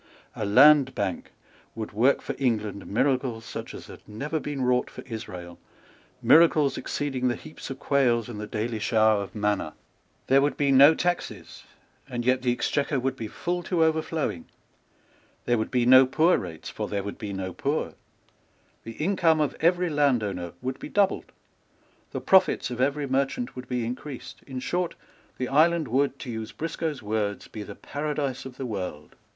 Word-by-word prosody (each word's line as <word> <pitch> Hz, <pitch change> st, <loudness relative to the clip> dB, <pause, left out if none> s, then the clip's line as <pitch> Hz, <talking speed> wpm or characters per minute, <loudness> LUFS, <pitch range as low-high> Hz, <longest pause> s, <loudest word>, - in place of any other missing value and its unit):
A 105 Hz, -, -3 dB
Land 135 Hz, +4 st, +6 dB
Bank 95 Hz, -3 st, -3 dB, 0.4 s
would 110 Hz, -1 st, -5 dB
work 120 Hz, +6 st, +2 dB
for 140 Hz, -, -3 dB
England 110 Hz, -6 st, -1 dB
miracles 125 Hz, 0 st, 0 dB
such -, -, -7 dB
as -, -, -9 dB
had -, -, -12 dB
never 145 Hz, +9 st, -3 dB
been 145 Hz, -3 st, -4 dB
wrought 125 Hz, 0 st, +2 dB
for -, -, -10 dB
Israel, 90 Hz, -7 st, -8 dB, 0.6 s
miracles 155 Hz, -3 st, +5 dB
exceeding 135 Hz, -3 st, -2 dB
the 120 Hz, -, +1 dB
heaps 80 Hz, -3 st, -10 dB
of 135 Hz, -, -5 dB
quails 120 Hz, -5 st, +2 dB
and 115 Hz, -4 st, -7 dB
the 105 Hz, -, -5 dB
daily 110 Hz, +1 st, -3 dB
shower 110 Hz, -1 st, +3 dB
of 100 Hz, -, -8 dB
manna. 105 Hz, -6 st, -1 dB, 0.5 s
There 135 Hz, +1 st, +4 dB
would 145 Hz, +1 st, 0 dB
be 140 Hz, -1 st, +2 dB
no 140 Hz, +4 st, +8 dB
taxes; 175 Hz, 0 st, -3 dB, 0.4 s
and 120 Hz, -2 st, -4 dB
yet 130 Hz, +1 st, +3 dB
the 125 Hz, -1 st, +1 dB
Exchequer 140 Hz, +3 st, 0 dB
would 130 Hz, +1 st, -1 dB
be 115 Hz, -4 st, -5 dB
full 175 Hz, +10 st, -3 dB
to 170 Hz, -1 st, +1 dB
overflowing. 160 Hz, -, -1 dB, 1.0 s
There 120 Hz, -2 st, +2 dB
would 110 Hz, -, -2 dB
be 125 Hz, -1 st, +1 dB
no 130 Hz, +1 st, +8 dB
poor 160 Hz, +7 st, +3 dB
rates; 85 Hz, -4 st, -6 dB
for -, -, -4 dB
there 100 Hz, -1 st, -2 dB
would 100 Hz, -, -6 dB
be 105 Hz, -3 st, -5 dB
no 95 Hz, -2 st, -4 dB
poor. -, -, -2 dB, 0.9 s
The 115 Hz, -, -8 dB
income 165 Hz, -, +2 dB
of 150 Hz, -2 st, 0 dB
every 175 Hz, +1 st, +2 dB
landowner 110 Hz, -, 0 dB
would 130 Hz, +1 st, -3 dB
be -, -, -7 dB
doubled. 200 Hz, -1 st, +1 dB, 0.8 s
The -, -, -5 dB
profits 190 Hz, -8 st, +3 dB
of 125 Hz, 0 st, -3 dB
every 140 Hz, +2 st, +1 dB
merchant 135 Hz, -, -1 dB
would 125 Hz, 0 st, -8 dB
be 125 Hz, -2 st, -1 dB
increased. 125 Hz, +1 st, -7 dB
In 130 Hz, -2 st, -5 dB
short, 175 Hz, +4 st, -2 dB, 0.4 s
the 125 Hz, -, -2 dB
island 160 Hz, +3 st, +3 dB
would, 140 Hz, +3 st, +1 dB
to 125 Hz, -, -5 dB
use 110 Hz, -1 st, -5 dB
Briscoe's 160 Hz, -4 st, -4 dB
words, 105 Hz, -1 st, -2 dB
be 110 Hz, -, -8 dB
the -, -, -8 dB
paradise 145 Hz, -3 st, -3 dB
of 130 Hz, -1 st, -9 dB
the 135 Hz, -, -4 dB
world. 90 Hz, -9 st, -5 dB
130 Hz, 175 wpm, -26 LUFS, 110-145 Hz, 1.0 s, no